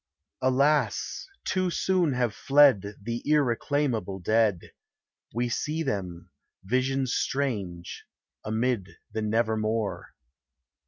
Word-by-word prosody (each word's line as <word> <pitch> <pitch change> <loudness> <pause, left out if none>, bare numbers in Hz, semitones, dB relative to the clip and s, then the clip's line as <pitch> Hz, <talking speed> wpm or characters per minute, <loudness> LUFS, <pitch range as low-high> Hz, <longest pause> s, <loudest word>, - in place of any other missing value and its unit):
Alas! 140 - +1 0.2
too 185 -1 +1
soon 175 -4 +1
have 125 -3 0
fled 135 -9 +4
The 115 +3 -4
irreclaimable 130 -7 +1
dead: 110 -2 +1 0.6
We 120 +2 -1
see 155 +7 -2
them 90 - -4 0.2
— - - -53
visions 130 +4 0
strange 100 -11 -2 0.2
— - - -64
amid 110 -2 -1
the 110 - -3
*v 110 - -1
Nevermore. 110 -3 -1
115 Hz, 105 wpm, -27 LUFS, 105-140 Hz, 0.6 s, fled